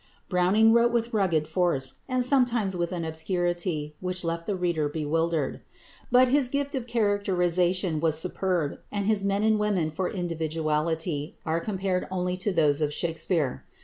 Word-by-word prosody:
Browning 200 +5 +4
wrote 235 +1 +4
with 235 0 -1
rugged 170 -7 +1
force, 160 -6 -1
and 255 -1 +1
sometimes 245 -7 +2
with 175 0 -2
an 170 -2 -3
obscurity 170 -1 -2
which 180 0 -3
left 165 0 -3
the 205 - 0
reader 170 -5 0
bewildered. 160 0 -1 0.5
But 250 +1 +6
his 270 -1 +3
gift 280 +2 -2
of 255 -3 -3
characterisation 185 -5 +1
was 160 -1 +1
superb, 180 -2 -1
and 200 -1 -2
his 210 -1 +2
men 200 +1 +1
and 220 -1 +3
women 195 -7 0
for 180 +4 -2
individuality 160 -2 -2
are 160 0 0
comparable 190 -2 -2
only 180 -1 -1
to 195 +3 -1
those 155 -4 +2
of 150 -1 +1
Shakspere. 160 -3 -1
180 Hz, 155 wpm, -27 LUFS, 160-205 Hz, 0.5 s, But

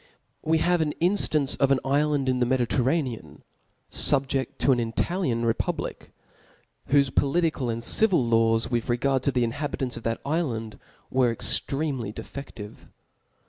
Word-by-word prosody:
We 160 +1 +1
have 175 +1 +2
an 150 -2 0
inftance 165 -6 +2
of 140 - +3
an 135 -1 +3
ifland 145 0 +1
in 130 -1 +1
the 125 - +2
Mcdi 130 0 +1
i - - +2
terraacan, 130 0 -2 0.5
fuh^ea: 135 -2 +2
to" 140 - +2
an 125 - +2
Italian 120 +2 -1
republic 115 - -3 0.4
\ - - -33
whofc 140 -2 +3
political 150 -3 +1
and 115 0 -3
civil 195 - +3
laWs^ 115 0 +2
vrtth 120 0 0
regatrf 135 +1 +1
to 140 - 0
the 125 -2 +1
iflha 145 +6 -3
bkantt 130 -5 -3
of - - -7
that 115 0 -3
ifland 125 -9 -3 0.3
were 130 -2 +3
extremely 135 0 0
defcflivc. 110 -3 -9
135 Hz, 155 wpm, -25 LUFS, 120-150 Hz, 0.5 s, of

